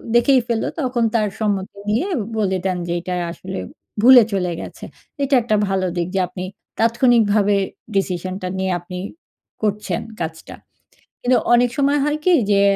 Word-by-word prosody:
দেখেই 255 +2 +5
ফেলল। 230 -2 0 0.2
তখন 250 -3 0
তার 215 -2 +2
সম্মতি 200 -2 -2
নিয়ে 250 - +1 0.3
বলে 190 -3 +1
দেন, 185 -1 0
যে - - -2
এইটা 180 +1 -5 0.2
আসলে 190 +2 -7 0.4
ভুলে 250 -1 +9
চলে 180 -2 0
গেছে। - - -10 0.4
এইটা 275 0 +2
একটা 215 -2 +1
ভালো 190 -1 0
দিক। 170 0 -1
যে - - +2
আপনি 180 +1 -7 0.4
তাৎক্ষণিকভাবে 225 -3 +3 0.4
ডিসিশনটা 185 0 -2
নিয়ে 190 0 -1
আপনি 180 +1 -8 0.6
করছেন 210 -4 -1 0.2
কাজটা। 160 -1 -6 0.7
কিন্তু 250 +1 +3 0.2
অনেক 245 0 +5
সময় 285 +1 +3
হয় 295 +1 0
কি? 365 - +5 0.2
যে 200 0 +4
205 Hz, 150 wpm, -20 LUFS, 185-240 Hz, 0.7 s, ভুলে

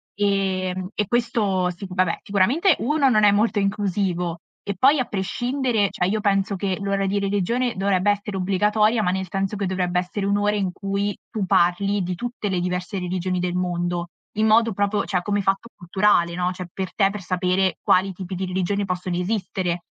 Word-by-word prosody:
Ehm, 190 -2 0
e 210 - 0
questo 220 -7 +1
sic 180 +1 -7
vabbè, 185 -2 +1
sicuramente 260 - +3
1 280 +1 +2
non 215 -3 +4
è 205 - +7
molto 210 +1 +2
inclusivo. 190 -4 -1 0.2
E 200 - -3
poi 275 - +5
a 250 - +1
prescindere, 235 +2 -1
cioè 180 - 0
io 215 +2 0
penso 195 -1 +1
che 190 -1 -2
l'ora 195 0 0
di 200 +1 0
religione 205 +5 0
dovrebbe 195 0 +1
essere 205 -1 -3
obbligatoria, 210 +4 +2
ma 180 - +2
nel 190 0 -2
senso 195 +2 -2
che 200 -2 -2
dovrebbe 180 -1 0
essere 195 +2 -3
1 200 +1 +2
ora 205 +1 +1
in 190 -3 -1
cui 200 +1 -2
tu 215 -4 -2
parli 190 +4 +2
di 180 0 -3
tutte 240 -1 -4
le 185 -2 0
diverse 180 +2 -3
religioni 185 0 -2
del 180 0 -1
mondo 175 -1 -1 0.3
in 220 +1 +2
modo 225 +1 +4
proprio 205 +1 0
cioè 180 -3 0
come 205 -1 0
fatto 195 +4 0
culturale, 175 -1 +2
no, 180 0 0
cioè 180 0 -6
per 190 -1 -5
te 195 -2 +4
per 205 0 -5
sapere 185 +1 0
quali 190 +1 +3
tipi 185 +1 -7
di 190 +1 -2
religioni 190 +2 -1
possono 180 -1 -3
esistere. 180 -3 -2
195 Hz, 190 wpm, -23 LUFS, 180-205 Hz, 0.3 s, è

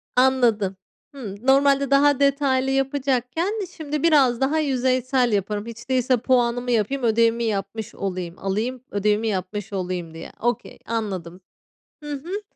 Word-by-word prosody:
Anladım. 240 -7 +3 0.4
Hımm. 215 -8 -7
Normalde 275 0 +4
daha 280 0 +4
detaylı 275 -2 +2
yapacakken 270 - 0 0.2
şimdi 300 -1 -3
biraz 270 -7 +4
daha 290 +4 +2
yüzeysel 255 -3 +1
yaparım 205 +1 -1
hiç 230 +2 -10
değilse, 255 -1 +2
puanımı 245 0 +1
yapayım, 240 +4 0
ödevimi 230 +1 +3
yapmış 215 +1 -3
olayım, 180 -3 -4
alayım, 225 +6 -2
ödevimi 210 +2 +1
yapmış 200 0 -3
olayım 180 -3 -3
diye. 165 0 -9
Okey. 240 -1 -2
Anladım. 190 -6 -4 0.6
Hı 295 0 -6
hı. 355 +9 -5
245 Hz, 130 wpm, -23 LUFS, 210-270 Hz, 0.6 s, Normalde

